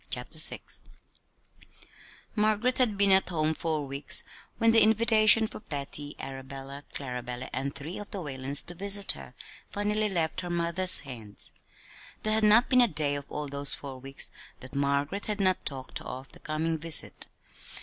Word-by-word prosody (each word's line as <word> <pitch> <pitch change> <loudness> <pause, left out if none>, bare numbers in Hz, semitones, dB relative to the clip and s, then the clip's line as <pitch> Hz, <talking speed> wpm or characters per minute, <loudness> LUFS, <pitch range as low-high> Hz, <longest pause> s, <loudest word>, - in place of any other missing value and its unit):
CHAPTER - - -5
VI - - -1 1.7
Margaret 215 +4 +1
had 225 -6 +3
been 200 0 +4
at 190 0 +5
home 155 -2 0
four 155 -2 -3
weeks 140 0 +1 0.3
when 230 0 +3
the 225 - +5
invitation 220 0 +6
for 215 - -8
Patty, 145 -3 -1
Arabella, 135 +1 -8
Clarabella, 125 -2 -6
and 135 +2 -3
three 150 +6 -7
of 205 - -9
the - - -7
Whalens 140 -3 -3
to 175 - -8
visit 200 +2 +2
her, - - -10 0.3
finally 210 +1 0
left 170 -3 -1
her 175 - -7
mother's 175 +2 +6
hands. 115 -7 -6 0.7
There 215 - +1
had 220 0 +2
not 215 +4 +6
been 255 -2 +4
a 240 - +5
day 155 -6 +1
of 145 -1 -6
all 150 0 -5
those 140 0 0
four 135 -2 -9
weeks 135 +1 -6 0.3
that 130 +1 -13
Margaret 140 +7 -1
had 210 -1 -3
not 185 -2 +1
talked 135 -2 -6
of 130 +1 -9
the - - -16
coming 160 +1 -3
visit. 165 -1 +2
160 Hz, 165 wpm, -28 LUFS, 140-205 Hz, 1.7 s, invitation